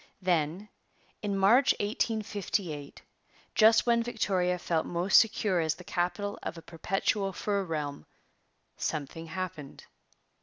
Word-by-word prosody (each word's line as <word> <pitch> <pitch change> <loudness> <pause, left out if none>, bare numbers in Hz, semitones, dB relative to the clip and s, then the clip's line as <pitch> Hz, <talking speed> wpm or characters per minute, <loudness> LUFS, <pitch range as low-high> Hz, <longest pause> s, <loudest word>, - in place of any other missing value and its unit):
Then, 175 +2 0 0.5
in 200 -2 -1
March 230 +8 +5
1858, 205 -8 -2 0.5
just 220 0 +5
when 235 -1 +3
Victoria 195 -6 0
felt 165 -2 -1
most 175 +3 +5
secure 210 -4 +1
as 160 -1 0
the 180 - -12
capital 185 +4 -2
of - - -5
a 165 - -10
perpetual 195 +4 -1
fur 200 +1 -1
realm, 150 - -4 0.7
something 155 +2 -4
happened. 160 -4 -6
185 Hz, 115 wpm, -29 LUFS, 165-210 Hz, 0.7 s, March